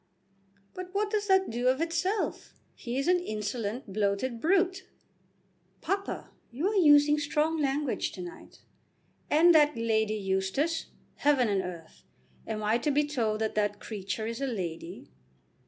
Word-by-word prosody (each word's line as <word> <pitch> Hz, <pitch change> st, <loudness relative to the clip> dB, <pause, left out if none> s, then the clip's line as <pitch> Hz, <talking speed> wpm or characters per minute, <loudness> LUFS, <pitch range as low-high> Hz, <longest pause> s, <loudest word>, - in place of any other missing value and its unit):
"But 365 Hz, +1 st, -8 dB
what 415 Hz, +1 st, 0 dB
does 420 Hz, -1 st, -1 dB
that 380 Hz, -, +3 dB
do 240 Hz, +2 st, -1 dB
of 260 Hz, +2 st, +3 dB
itself? 335 Hz, +5 st, -2 dB, 0.2 s
He 240 Hz, +1 st, -5 dB
is 275 Hz, -, -1 dB
an 360 Hz, 0 st, +4 dB
insolent, 215 Hz, -, -4 dB
bloated 215 Hz, +4 st, -1 dB
brute." 370 Hz, +2 st, +1 dB, 0.9 s
"Papa, 395 Hz, +1 st, -3 dB, 0.2 s
you 280 Hz, +10 st, -2 dB
are 430 Hz, -, -2 dB
using 295 Hz, -4 st, +6 dB
strong 300 Hz, +2 st, 0 dB
language 280 Hz, +1 st, -1 dB
to -, -, -7 dB
night." 345 Hz, -1 st, -11 dB, 0.7 s
"And 335 Hz, +3 st, +6 dB
that 300 Hz, -4 st, +4 dB
Lady 220 Hz, -1 st, +1 dB
Eustace! 195 Hz, +11 st, -1 dB, 0.3 s
Heaven 280 Hz, -4 st, +3 dB
and 195 Hz, -2 st, +1 dB
earth! 175 Hz, -3 st, -9 dB, 0.5 s
Am 215 Hz, -1 st, -3 dB
I 220 Hz, +3 st, +2 dB
to 295 Hz, -, -1 dB
be 290 Hz, +1 st, +3 dB
told 225 Hz, -7 st, -1 dB
that 220 Hz, -, -1 dB
that 205 Hz, -1 st, 0 dB
creature 210 Hz, 0 st, -4 dB
is 230 Hz, +3 st, -4 dB
a 275 Hz, -, 0 dB
lady?" 175 Hz, -, -5 dB
265 Hz, 150 wpm, -29 LUFS, 215-330 Hz, 0.9 s, using